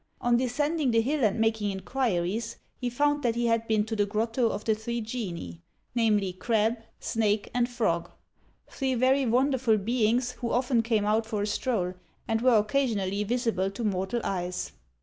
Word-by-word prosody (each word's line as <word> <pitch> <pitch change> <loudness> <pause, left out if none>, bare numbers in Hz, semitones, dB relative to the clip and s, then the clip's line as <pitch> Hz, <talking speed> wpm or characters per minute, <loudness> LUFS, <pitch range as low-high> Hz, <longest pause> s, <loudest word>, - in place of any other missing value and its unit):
On 240 0 +2
descending 285 +4 0
the 230 -1 +3
hill 280 +3 0
and 215 +1 +2
making 220 -2 +1
inquiries, 210 0 -1 0.2
he 250 - -3
found 290 +4 +1
that 235 -4 +1
he 240 0 0
had 230 -1 +1
been 215 -1 +2
to 220 0 -3
the 205 -1 +1
Grotto 225 +3 0
of 205 - -4
the 220 - +3
Three 235 +2 -3
Genii 215 -8 -5 0.3
namely, 210 -5 +2
Crab, 225 +4 +1 0.2
Snake, 215 -2 0
and 245 0 +1
Frog, 215 -9 0 0.6
three 265 -2 -2
very 260 +2 +3
wonderful 250 -1 +3
beings, 235 +3 +1
who 245 -1 -5
often 245 -1 +2
came 225 -2 +1
out 220 +1 +1
for 210 -3 -2
a - - +1
stroll, 210 -4 -1 0.3
and 225 -1 0
were 250 -2 +5
occasionally 210 -4 0
visible 225 -4 0
to 200 +4 -6
mortal 195 +2 -1
eyes. 180 -1 -3
225 Hz, 170 wpm, -28 LUFS, 210-245 Hz, 0.6 s, were